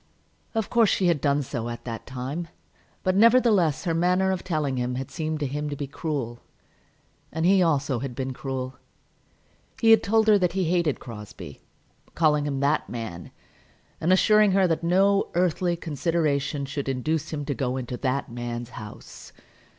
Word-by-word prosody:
Of 220 Hz, -2 st, -1 dB
course 230 Hz, -3 st, +4 dB
she 190 Hz, -, +1 dB
had 160 Hz, -5 st, +1 dB
done 145 Hz, 0 st, +2 dB
so, 120 Hz, -2 st, -4 dB
at 120 Hz, -, -7 dB
that 115 Hz, -2 st, -6 dB
time; 135 Hz, +6 st, -4 dB, 0.6 s
but, 185 Hz, 0 st, +1 dB
nevertheless, 215 Hz, -, +4 dB
her 170 Hz, -3 st, 0 dB
manner 180 Hz, +3 st, +2 dB
of 185 Hz, -, -3 dB
telling 155 Hz, -7 st, -1 dB
him 125 Hz, 0 st, -1 dB
had 130 Hz, 0 st, -5 dB
seemed 155 Hz, -1 st, -3 dB
to -, -, +1 dB
him 145 Hz, +2 st, -3 dB
to 145 Hz, -, -4 dB
be 145 Hz, -, -4 dB
cruel. 135 Hz, -5 st, -4 dB, 0.9 s
And 160 Hz, +1 st, -1 dB
he 190 Hz, +1 st, +5 dB
also 145 Hz, -6 st, +1 dB
had 130 Hz, -1 st, -5 dB
been 130 Hz, 0 st, -3 dB
cruel. 130 Hz, -2 st, -5 dB, 1.0 s
He 225 Hz, -1 st, +5 dB
had 225 Hz, -, +7 dB
told 220 Hz, +1 st, +2 dB
her 210 Hz, -2 st, +6 dB
that 180 Hz, -2 st, +1 dB
he 190 Hz, 0 st, 0 dB
hated 170 Hz, -3 st, +1 dB
Crosbie, 105 Hz, -, -10 dB, 0.5 s
calling 150 Hz, -3 st, +2 dB
him 140 Hz, -1 st, -2 dB
"that 145 Hz, +2 st, +1 dB
man," 100 Hz, -8 st, -6 dB, 0.7 s
and 165 Hz, -, +1 dB
assuring 210 Hz, +1 st, +5 dB
her 195 Hz, -1 st, +4 dB
that 165 Hz, -2 st, 0 dB
no 195 Hz, +3 st, +3 dB
earthly 175 Hz, 0 st, +1 dB
consideration 150 Hz, -3 st, -1 dB
should 140 Hz, 0 st, -4 dB
induce 140 Hz, +4 st, -1 dB
him 145 Hz, -2 st, -4 dB
to 140 Hz, -, -1 dB
go 130 Hz, -2 st, -2 dB
into 125 Hz, -1 st, -4 dB
"that 135 Hz, +1 st, -1 dB
man's 120 Hz, 0 st, -5 dB
house." 105 Hz, -3 st, -10 dB
150 Hz, 175 wpm, -25 LUFS, 130-180 Hz, 1.0 s, had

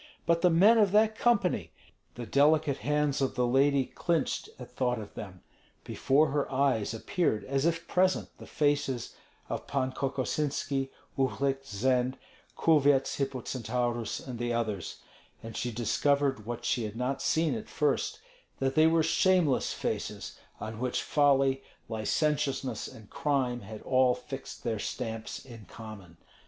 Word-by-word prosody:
But 170 Hz, 0 st, +2 dB
the 180 Hz, -, +5 dB
men 200 Hz, +8 st, +6 dB
of 205 Hz, -3 st, +4 dB
that 215 Hz, +1 st, +4 dB
company! 185 Hz, -, +1 dB, 0.4 s
The 120 Hz, -, -6 dB
delicate 145 Hz, +2 st, +3 dB
hands 150 Hz, -1 st, 0 dB
of 135 Hz, -, 0 dB
the 125 Hz, 0 st, +2 dB
lady 135 Hz, +2 st, +3 dB
clinched 165 Hz, +4 st, -1 dB
at 125 Hz, -, -10 dB
thought 125 Hz, -2 st, 0 dB
of 105 Hz, -2 st, -8 dB
them. 95 Hz, -2 st, -9 dB, 0.4 s
Before 145 Hz, +2 st, +2 dB
her 145 Hz, 0 st, -1 dB
eyes 130 Hz, -5 st, +1 dB
appeared 115 Hz, -1 st, 0 dB
as 135 Hz, +3 st, 0 dB
if 165 Hz, 0 st, -1 dB
present 185 Hz, +1 st, +1 dB
the -, -, -11 dB
faces 145 Hz, -4 st, 0 dB, 0.3 s
of -, -, -5 dB
Pan 130 Hz, -2 st, 0 dB
Kokosinski, 135 Hz, 0 st, -1 dB, 0.3 s
Uhlik, 135 Hz, +1 st, 0 dB
Zend, 125 Hz, +3 st, 0 dB, 0.4 s
Kulvyets 145 Hz, -4 st, +3 dB
Hippocentaurus, 120 Hz, -3 st, -2 dB
and 125 Hz, -3 st, -6 dB
the 120 Hz, 0 st, -1 dB
others; 110 Hz, -6 st, -3 dB, 0.4 s
and 115 Hz, -1 st, -8 dB
she 120 Hz, -, -2 dB
discovered 130 Hz, +1 st, +1 dB
what 120 Hz, 0 st, -5 dB
she 120 Hz, -, +1 dB
had 105 Hz, 0 st, -6 dB
not 125 Hz, +3 st, -2 dB
seen 160 Hz, 0 st, +2 dB
at 220 Hz, -2 st, -6 dB
first, -, -, 0 dB, 0.4 s
that 135 Hz, 0 st, 0 dB
they 155 Hz, +2 st, +5 dB
were 165 Hz, 0 st, +3 dB
shameless 170 Hz, -3 st, +3 dB
faces, -, -, -4 dB, 0.2 s
on 110 Hz, 0 st, -6 dB
which 125 Hz, 0 st, -1 dB
folly, 135 Hz, -2 st, +3 dB, 0.3 s
licentiousness, 135 Hz, +4 st, -1 dB
and 110 Hz, -2 st, -13 dB
crime 130 Hz, -4 st, 0 dB
had 110 Hz, 0 st, -9 dB
all 130 Hz, -1 st, +3 dB
fixed 125 Hz, +2 st, -8 dB
their 110 Hz, -2 st, -1 dB
stamps 115 Hz, +1 st, -5 dB
in 115 Hz, -5 st, -11 dB
common. 100 Hz, -7 st, -11 dB
135 Hz, 145 wpm, -29 LUFS, 120-150 Hz, 0.4 s, men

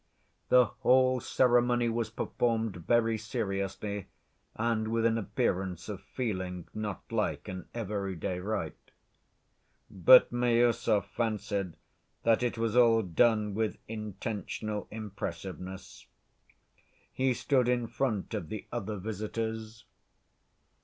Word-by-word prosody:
The 125 Hz, -1 st, +7 dB
whole 130 Hz, +1 st, +3 dB
ceremony 120 Hz, -1 st, +3 dB
was 115 Hz, -1 st, -1 dB
performed 115 Hz, -1 st, -1 dB
very 115 Hz, -2 st, +3 dB
seriously 100 Hz, -2 st, -3 dB, 0.5 s
and 110 Hz, -1 st, 0 dB
with 115 Hz, 0 st, +1 dB
an 115 Hz, 0 st, +3 dB
appearance 95 Hz, -3 st, -1 dB
of 100 Hz, -3 st, -5 dB
feeling, 95 Hz, -8 st, -4 dB
not 105 Hz, -3 st, -4 dB
like -, -, -1 dB
an 95 Hz, -1 st, -6 dB
everyday 100 Hz, -5 st, -3 dB
rite. 105 Hz, +4 st, -2 dB, 1.2 s
But 100 Hz, +6 st, +7 dB
Miüsov 120 Hz, -3 st, +2 dB
fancied 100 Hz, -4 st, -2 dB, 0.5 s
that 115 Hz, 0 st, +4 dB
it 120 Hz, -1 st, -1 dB
was 115 Hz, 0 st, 0 dB
all 115 Hz, -2 st, +5 dB
done 105 Hz, +3 st, +2 dB
with 110 Hz, +1 st, -1 dB
intentional 105 Hz, 0 st, -4 dB
impressiveness. 95 Hz, -3 st, -7 dB, 1.1 s
He 130 Hz, -1 st, +1 dB
stood 130 Hz, -1 st, +2 dB
in 120 Hz, -1 st, +1 dB
front 115 Hz, -4 st, -2 dB
of 80 Hz, -, -3 dB
the 110 Hz, -, -5 dB
other 110 Hz, -3 st, -3 dB
visitors. 110 Hz, +2 st, -4 dB
110 Hz, 105 wpm, -30 LUFS, 100-120 Hz, 1.2 s, The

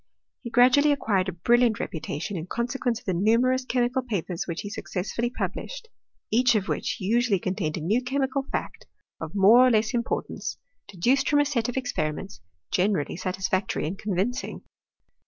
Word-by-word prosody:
He 235 Hz, -, -6 dB
gradually 255 Hz, +5 st, +5 dB
acquired 200 Hz, -9 st, +1 dB
a -, -, -2 dB
brilliant 235 Hz, +6 st, +2 dB
reputation 165 Hz, +5 st, -4 dB
in 165 Hz, 0 st, -5 dB
consequence 245 Hz, +2 st, -1 dB
of -, -, -13 dB
the 185 Hz, -, 0 dB
numerous 235 Hz, +7 st, +2 dB
chemical 250 Hz, 0 st, +1 dB
papers 195 Hz, -8 st, -3 dB
which 170 Hz, -2 st, -3 dB
he 205 Hz, -, -6 dB
successively 215 Hz, +4 st, -3 dB
published, 475 Hz, -, -5 dB, 0.4 s
each 245 Hz, +1 st, +4 dB
of 200 Hz, -3 st, 0 dB
which -, -, -2 dB
usually 225 Hz, +2 st, +2 dB
contained 180 Hz, -3 st, -2 dB
a -, -, -5 dB
new 210 Hz, +10 st, +1 dB
chemical 270 Hz, +1 st, -1 dB
fact, -, -, -4 dB, 0.3 s
of 160 Hz, +3 st, -7 dB
more 205 Hz, +5 st, +7 dB
or -, -, +5 dB
less 220 Hz, -1 st, +2 dB
im 240 Hz, -, +2 dB
portance, -, -, -4 dB, 0.3 s
deduced 245 Hz, +9 st, +1 dB
from 290 Hz, -, +3 dB
a 290 Hz, -, +4 dB
set 245 Hz, -5 st, -1 dB
of 245 Hz, -, -4 dB
experiments 190 Hz, -, -3 dB, 0.3 s
generally 185 Hz, -5 st, +1 dB
satisfactory 190 Hz, 0 st, -1 dB
and 180 Hz, +5 st, -4 dB
convincing. 205 Hz, +5 st, -2 dB
220 Hz, 165 wpm, -26 LUFS, 185-250 Hz, 0.4 s, more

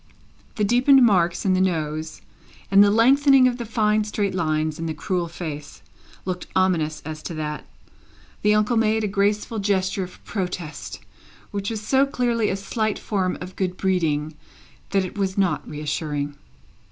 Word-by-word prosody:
The 210 Hz, -, 0 dB
deepened 250 Hz, +4 st, +5 dB
marks 175 Hz, -5 st, +2 dB
in 190 Hz, -, +3 dB
the 185 Hz, -, +2 dB
nose, 155 Hz, -3 st, -2 dB, 0.5 s
and 195 Hz, +1 st, +8 dB
the 205 Hz, -, +5 dB
lengthening 265 Hz, +4 st, +5 dB
of 245 Hz, -1 st, -1 dB
the 235 Hz, -, -5 dB
fine 215 Hz, -1 st, +2 dB
straight 205 Hz, -2 st, -2 dB
lines 155 Hz, -3 st, -1 dB
in 165 Hz, -, -3 dB
the 160 Hz, -, -3 dB
cruel 180 Hz, -2 st, -2 dB
face, 155 Hz, -4 st, -7 dB, 0.4 s
looked 180 Hz, -1 st, -4 dB
ominous 165 Hz, -5 st, +1 dB
as 155 Hz, 0 st, -6 dB
to 165 Hz, -, -6 dB
that; 150 Hz, -1 st, -5 dB, 0.7 s
the 210 Hz, 0 st, +4 dB
uncle 215 Hz, +3 st, +2 dB
made 220 Hz, 0 st, +2 dB
a -, -, +1 dB
graceful 205 Hz, +2 st, 0 dB
gesture 195 Hz, -1 st, 0 dB
of 180 Hz, -, -11 dB
protest, 180 Hz, -5 st, -5 dB, 0.5 s
which 200 Hz, -1 st, -3 dB
was 220 Hz, -2 st, -4 dB
so 265 Hz, +5 st, +2 dB
clearly 240 Hz, -5 st, 0 dB
a -, -, 0 dB
slight 215 Hz, +2 st, -2 dB
form 190 Hz, -3 st, -1 dB
of 185 Hz, +1 st, -8 dB
good 185 Hz, -1 st, -2 dB
breeding 160 Hz, -5 st, 0 dB, 0.6 s
that 195 Hz, -1 st, +1 dB
it 185 Hz, -, -8 dB
was 190 Hz, -1 st, -1 dB
not 195 Hz, -2 st, 0 dB
reassuring. 145 Hz, -1 st, -3 dB
190 Hz, 165 wpm, -23 LUFS, 165-215 Hz, 0.7 s, and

